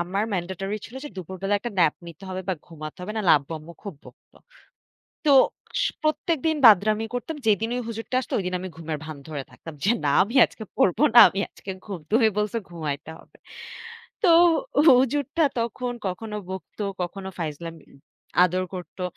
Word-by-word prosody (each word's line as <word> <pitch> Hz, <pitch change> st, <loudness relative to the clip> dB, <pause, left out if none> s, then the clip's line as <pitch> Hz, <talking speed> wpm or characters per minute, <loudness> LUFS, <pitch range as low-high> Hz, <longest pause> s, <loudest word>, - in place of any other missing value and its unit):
আমার 190 Hz, +5 st, -1 dB
ম্যান্ডেটরি 190 Hz, +3 st, -3 dB
ছিল 235 Hz, -, -12 dB
যে -, -, -5 dB
দুপুরবেলা 190 Hz, +3 st, -3 dB
একটা 235 Hz, +4 st, -5 dB
ন্যাপ 160 Hz, -4 st, +4 dB
নিতে 170 Hz, +2 st, -12 dB
হবে 185 Hz, 0 st, -4 dB
বা 190 Hz, -, +1 dB
ঘুমাতে 155 Hz, +1 st, -9 dB
হবে। 180 Hz, +4 st, -6 dB
নাইলে 200 Hz, -6 st, +4 dB
আব্বু 140 Hz, +4 st, -10 dB
আম্মু 155 Hz, +3 st, -12 dB
খুব 200 Hz, -4 st, -7 dB
বকতো। -, -, -18 dB, 0.9 s
তো 290 Hz, -, +5 dB, 0.5 s
স -, -, +2 dB, 0.2 s
প্রত্যেকদিন 315 Hz, 0 st, 0 dB
বাদরামি 215 Hz, +1 st, +6 dB
করতাম। 275 Hz, +6 st, -4 dB
যেদিন 220 Hz, +1 st, +2 dB
ওই 250 Hz, -, -2 dB
হুজুরটা 225 Hz, +2 st, -5 dB
আসতো 225 Hz, -, -8 dB
ওইদিন 185 Hz, -2 st, -2 dB
আমি 185 Hz, -, -5 dB
ঘুমের 160 Hz, -1 st, -5 dB
ভান 155 Hz, -2 st, -7 dB
ধরে 145 Hz, -3 st, -5 dB
থাকতাম। 165 Hz, -, -11 dB
যে, 200 Hz, -, +2 dB, 0.2 s
না 145 Hz, -, +3 dB
আমি 230 Hz, +7 st, -7 dB
আজকে 220 Hz, -, -11 dB
পড়ব 180 Hz, -, +2 dB, 0.2 s
না, -, -, +11 dB
আমি 195 Hz, -, -3 dB
আজকে 190 Hz, -, -8 dB
ঘুম। 195 Hz, -5 st, -6 dB
তুমি 225 Hz, 0 st, +5 dB
বলছো 210 Hz, +2 st, 0 dB
ঘুমাইতে 155 Hz, -3 st, -5 dB
হবে। -, -, -21 dB, 0.9 s
তো -, -, +5 dB, 0.6 s
হুজুরটা 280 Hz, +5 st, +3 dB, 0.2 s
তখন 245 Hz, +2 st, -3 dB
কখনো 210 Hz, +4 st, -5 dB
বকতো, 190 Hz, +2 st, -6 dB, 0.2 s
কখনো 190 Hz, +2 st, -5 dB
ফাইজলাম 165 Hz, +1 st, -5 dB, 0.2 s
উম -, -, -18 dB, 0.5 s
আদর 185 Hz, +1 st, +1 dB
করতো। 180 Hz, +1 st, -9 dB
195 Hz, 170 wpm, -24 LUFS, 170-225 Hz, 0.9 s, না